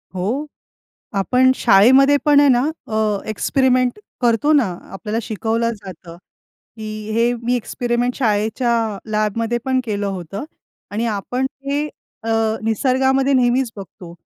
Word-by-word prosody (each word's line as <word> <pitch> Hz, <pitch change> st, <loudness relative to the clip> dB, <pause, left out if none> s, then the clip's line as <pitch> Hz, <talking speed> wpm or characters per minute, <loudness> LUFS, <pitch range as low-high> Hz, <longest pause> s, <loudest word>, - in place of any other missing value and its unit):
हो. 230 Hz, +12 st, -2 dB, 0.7 s
आपण 255 Hz, +6 st, +3 dB
शाळेमध्ये 260 Hz, +7 st, +5 dB
पण 290 Hz, -1 st, +6 dB
आहे 290 Hz, -, +5 dB
ना 245 Hz, -1 st, +4 dB, 0.3 s
अ, 215 Hz, -2 st, 0 dB
एक्सपेरिमेंट 255 Hz, -, +1 dB, 0.2 s
करतो 240 Hz, +5 st, +2 dB
ना. 255 Hz, -10 st, +3 dB, 0.2 s
आपल्याला 210 Hz, +3 st, -3 dB
शिकवलं 225 Hz, +2 st, -1 dB
जातं, 180 Hz, -4 st, -11 dB, 0.6 s
की 215 Hz, 0 st, -6 dB
हे 235 Hz, +2 st, +2 dB
मी 245 Hz, +1 st, +1 dB
एक्सपेरिमेंट 245 Hz, +1 st, -1 dB
शाळेच्या 225 Hz, -1 st, 0 dB
लॅबमध्ये 220 Hz, +2 st, 0 dB
पण 260 Hz, -1 st, +1 dB
केलं 205 Hz, -2 st, -2 dB
होतं. 190 Hz, -, -5 dB, 0.5 s
आणि 220 Hz, +3 st, -1 dB
आपण 230 Hz, +5 st, -2 dB, 0.2 s
हे 285 Hz, +2 st, -1 dB, 0.4 s
अ, 225 Hz, -, -3 dB, 0.3 s
निसर्गामध्ये 265 Hz, +4 st, +2 dB
नेहमीच 250 Hz, -1 st, +2 dB
बघतो, 185 Hz, -3 st, -11 dB
230 Hz, 120 wpm, -19 LUFS, 210-255 Hz, 0.7 s, पण